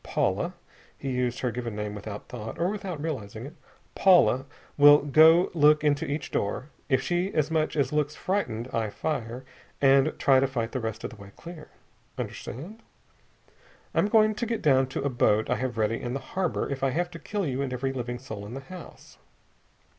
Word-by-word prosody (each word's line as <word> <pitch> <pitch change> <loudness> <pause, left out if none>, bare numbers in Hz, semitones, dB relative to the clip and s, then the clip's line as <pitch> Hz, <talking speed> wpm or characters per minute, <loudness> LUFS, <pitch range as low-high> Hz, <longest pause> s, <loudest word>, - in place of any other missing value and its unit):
Paula" - - -1 0.4
he 135 - -4
used 125 -1 -1
her 125 - 0
given 120 -2 -5
came 105 0 -4
without 105 0 -7
thought, 110 -2 -7
or 175 +2 +1
without 195 -6 -5
realizing 120 -8 -5
it 145 - -9 0.4
"Paula 170 -8 +4 0.3
will 145 0 +8
go 160 +5 +6
and - - -13
look 150 -1 +5
into 145 -1 +1
each 145 +1 -3
door. 130 +8 -2 0.2
If 135 -1 +2
she 175 +2 0
as 155 0 +1
much 155 -1 0
as 140 -1 +1
looks 150 0 0
frightened, 130 - -2
I 110 -2 0
fire, 125 0 -4 0.3
and 135 -1 +5
try 135 -1 +4
to 135 - +2
fight 120 -4 -3
the 130 - -2
rest 110 -2 -4
of - - -4
the 115 - -12
way 100 -1 -12
clear. 170 -2 -10 0.5
Understand? 190 - -7 1.1
I'm - - +2
going 215 0 +4
to 235 +2 -3
get 230 0 -2
down 135 -3 +4
to 135 - -4
a 140 - +1
boat 110 -3 +2
I - - +2
have 125 -2 -3
ready 110 +1 0
in 120 +1 -3
the - - -2
harbor 185 -3 -1
if 135 -1 -4
I 135 - +3
have 175 +6 -1
to 165 - -9
kill 205 +1 -3
you 135 -2 -2
and 135 -2 -2
every 135 +1 -2
living 120 -1 -4
soul 110 -5 -8
in 115 - -8
the - - -4
house!" 180 +4 -12
135 Hz, 200 wpm, -27 LUFS, 120-160 Hz, 1.1 s, will